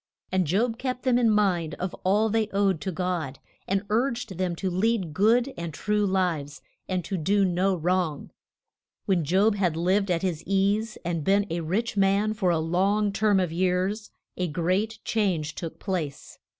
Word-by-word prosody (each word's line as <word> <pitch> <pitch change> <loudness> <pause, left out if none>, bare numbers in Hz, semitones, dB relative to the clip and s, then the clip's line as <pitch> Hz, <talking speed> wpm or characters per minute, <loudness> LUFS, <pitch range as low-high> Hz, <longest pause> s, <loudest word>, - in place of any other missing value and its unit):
And 185 -3 +1
Job 225 +7 0
kept 255 -1 -3
them 250 -2 +3
in 235 -2 +3
mind 185 -7 +1
of 185 0 -4
all 205 +4 +3
they 220 0 +1
owed 195 -4 +1
to 190 - -2
God, 175 -6 -2 0.3
and 195 +1 0
urged 235 -2 0
them 180 -2 0
to 185 +2 -2
lead 190 -3 0
good 235 - +3
and 170 -1 -5
true 210 +6 0
lives, 170 -6 -1 0.3
and 185 -2 -1
to 195 - -3
do 195 +5 +2
no 185 +1 +1
wrong. 175 -3 -1 0.7
When 185 -4 +2
Job 190 +8 +3
had 180 -6 0
lived 190 +4 +1
at 175 0 0
his 175 -5 -1
ease 200 +3 +1
and 170 -3 -2
been 200 +4 +3
a 170 - -1
rich 205 +8 -2
man 200 +2 +2
for 200 -4 0
a 170 - +2
long 195 +6 +1
term 205 -1 +3
of 180 -3 0
years, 185 +4 0 0.3
a 180 - 0
great 185 +8 -1
change 180 -9 0
took 165 -2 -6
place. 165 -8 -4
190 Hz, 175 wpm, -26 LUFS, 175-210 Hz, 0.7 s, them